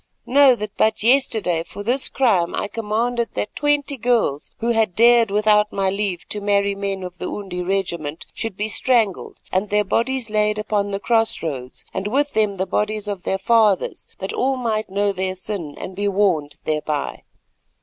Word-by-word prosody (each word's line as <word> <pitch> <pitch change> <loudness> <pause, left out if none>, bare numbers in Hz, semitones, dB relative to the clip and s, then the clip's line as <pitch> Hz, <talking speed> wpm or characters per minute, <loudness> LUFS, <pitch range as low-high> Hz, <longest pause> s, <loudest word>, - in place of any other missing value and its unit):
Know 270 0 +6
that 210 -3 -6
but 220 -1 +2
yesterday 225 -9 +2
for 200 +4 -8
this 250 +5 +2
crime 200 -10 +2
I - - -2
commanded 230 +3 -2
that 105 - -3
twenty 290 -1 0
girls 225 - +1
who 230 - -2
had 220 -6 +1
dared 235 -1 +5
without 210 +1 +3
my 195 -1 0
leave 195 -3 -3
to 210 - 0
marry 200 0 +2
men 195 -1 -3
of 180 -1 -8
the - - -4
Undi 190 -3 -5
regiment, 175 -5 -2
should 225 -4 -5
be 210 - -1
strangled 225 -4 +1
and 190 +2 0
their 210 0 +2
bodies 235 +3 -1
laid 210 0 +1
upon 210 -1 -1
the 195 0 -2
cross 225 -2 +1
roads 130 -5 -5
and 190 +1 -3
with 285 +6 0
them 215 -2 +1
the 190 - 0
bodies 210 +1 -1
of 200 -3 -4
their 190 - -1
fathers, 215 -1 +2
that 190 - -5
all 265 +1 0
might 220 -4 -1
know 200 +1 +1
their 185 -1 -2
sin 185 -6 -5
and 185 - -7
be 205 +1 -1
warned 185 -8 +1
thereby. 150 -1 -2
205 Hz, 180 wpm, -21 LUFS, 190-225 Hz, -, Know